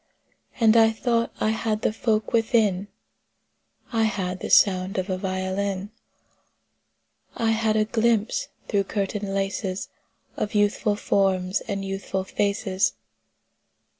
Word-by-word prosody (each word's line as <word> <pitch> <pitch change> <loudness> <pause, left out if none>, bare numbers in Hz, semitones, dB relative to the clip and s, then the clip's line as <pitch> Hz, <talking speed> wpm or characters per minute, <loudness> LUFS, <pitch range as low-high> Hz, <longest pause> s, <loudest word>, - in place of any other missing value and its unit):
And 225 -1 +5
I 225 -1 +7
thought 230 +1 0
I 215 - +1
had 220 -1 -2
the - - +1
folk 220 -1 0
within: 220 -4 +2 1.1
I 225 -1 +3
had 190 -4 -2
the - - -5
sound 185 -1 +4
of 190 +1 -2
a 185 - -1
violin; 190 +1 -2 1.4
I 225 -1 +1
had 220 -1 +1
a 215 0 +3
glimpse 225 0 +1 0.2
through 200 -1 +1
curtain 200 0 -3
laces 195 -1 -2 0.5
Of 215 +1 -3
youthful 205 +1 +2
forms 190 -2 +1
and 200 -2 -3
youthful 195 0 -3
faces. 200 0 0
205 Hz, 120 wpm, -24 LUFS, 190-220 Hz, 1.4 s, I